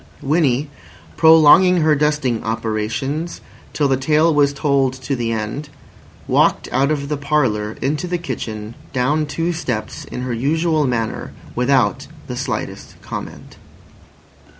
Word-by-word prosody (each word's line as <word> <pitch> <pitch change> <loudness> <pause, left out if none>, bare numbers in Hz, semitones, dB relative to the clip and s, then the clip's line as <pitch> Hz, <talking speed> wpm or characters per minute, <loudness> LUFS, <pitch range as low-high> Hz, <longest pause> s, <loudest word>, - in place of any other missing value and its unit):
Winnie, 145 -2 +1 0.5
prolonging 160 +3 +6
her 155 0 +4
dusting 145 -5 0
operations 115 +9 -3 0.3
till 145 - +1
the 135 - +2
tale 155 +4 +3
was 145 -1 +3
told 140 -2 +1
to 130 +1 -4
the 120 -2 -2
end, 115 +7 -4 0.6
walked - - +2
out 135 +3 +2
of 145 -2 -1
the 150 0 -2
parlour 130 -8 0
into 150 +6 -1
the 175 0 -1
kitchen 110 -10 -5 0.2
(down 145 +4 +1
two 165 +3 -1
steps) 125 -10 -4
in 125 - -6
her 125 -1 -2
usual 155 +4 +1
manner, 115 -3 -3 0.2
without 125 +1 +1 0.2
the - - -6
slightest - - -5
comment. - - -8
140 Hz, 130 wpm, -19 LUFS, 125-155 Hz, 0.6 s, prolonging